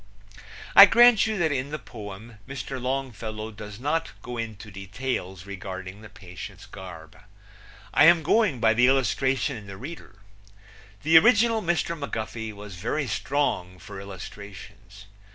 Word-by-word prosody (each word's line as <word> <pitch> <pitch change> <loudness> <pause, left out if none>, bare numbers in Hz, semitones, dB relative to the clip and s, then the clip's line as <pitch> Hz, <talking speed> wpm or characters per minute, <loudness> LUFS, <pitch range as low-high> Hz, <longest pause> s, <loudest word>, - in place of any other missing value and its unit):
I 200 - +12
grant 235 +1 +6
you 220 -1 -2
that 165 -4 +1
in 135 0 -2
the 155 - -4
poem 110 -2 -10
Mr. 135 -1 -6
Longfellow 115 -4 -4
does 105 0 -10
not 155 +3 -1
go 125 - -6
into 110 -3 -6
details 95 -2 -5
regarding 95 0 -7
the 110 - -12
patient's 90 -4 -10
garb. 90 -4 -11 0.8
I 145 - +6
am 170 0 +6
going 185 - +2
by 110 -1 +4
the 125 +3 +4
illustration 135 0 +1
in 105 -2 -11
the 100 -1 -8
reader. 135 - -9 0.9
The 160 +2 +8
original 225 +2 +4
Mr. 170 -2 0
McGuffey 115 -6 -5
was 100 -3 -10
very 145 - -2
strong 115 -10 -1
for 100 +3 -10
illustrations. 100 0 -11
115 Hz, 140 wpm, -26 LUFS, 100-145 Hz, 0.9 s, I